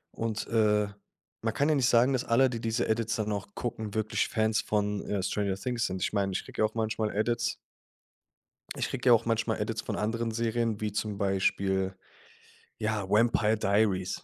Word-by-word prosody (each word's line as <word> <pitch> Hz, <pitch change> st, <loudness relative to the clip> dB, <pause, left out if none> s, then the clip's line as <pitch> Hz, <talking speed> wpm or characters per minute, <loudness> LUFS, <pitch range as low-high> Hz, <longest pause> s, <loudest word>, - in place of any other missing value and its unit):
Und, 115 Hz, -1 st, -3 dB
äh, 105 Hz, -2 st, +3 dB, 0.5 s
man 115 Hz, -1 st, -1 dB
kann 140 Hz, -, +1 dB
ja 155 Hz, -, +3 dB
nicht 130 Hz, -4 st, +3 dB
sagen, 120 Hz, +3 st, +4 dB
dass 130 Hz, -, 0 dB
alle, 130 Hz, +3 st, +4 dB
die 115 Hz, -2 st, -5 dB
diese 115 Hz, +1 st, 0 dB
Edits 115 Hz, +1 st, 0 dB
dann 105 Hz, -1 st, -1 dB
auch 100 Hz, -2 st, -4 dB
gucken, 110 Hz, -3 st, -4 dB
wirklich 110 Hz, 0 st, 0 dB
Fans 110 Hz, -1 st, +1 dB
von, 105 Hz, -1 st, -1 dB
äh, 100 Hz, -2 st, -1 dB
Stranger 100 Hz, 0 st, -1 dB
Things 120 Hz, +4 st, -1 dB
sind. 95 Hz, 0 st, -4 dB
Ich -, -, -1 dB
meine, 100 Hz, -2 st, +1 dB
ich 95 Hz, -, -3 dB
kriege -, -, -5 dB
ja -, -, +5 dB
auch 110 Hz, -, -3 dB
manchmal 110 Hz, -1 st, -1 dB
Edits 115 Hz, +3 st, 0 dB, 1.2 s
Ich -, -, -2 dB
kriege 130 Hz, -1 st, 0 dB
ja -, -, +9 dB
auch 115 Hz, 0 st, +3 dB
manchmal 115 Hz, -1 st, 0 dB
Edits 110 Hz, +1 st, -2 dB
von 110 Hz, -, -3 dB
anderen 115 Hz, +2 st, -1 dB
Serien, 115 Hz, -1 st, -1 dB
wie 105 Hz, -1 st, -1 dB
zum 105 Hz, 0 st, -3 dB
Beispiel, 95 Hz, -1 st, +1 dB, 0.9 s
ja, 110 Hz, -2 st, -1 dB
Vampire 110 Hz, +1 st, +3 dB
Diaries. 100 Hz, -2 st, +1 dB
110 Hz, 190 wpm, -29 LUFS, 105-115 Hz, 1.2 s, ja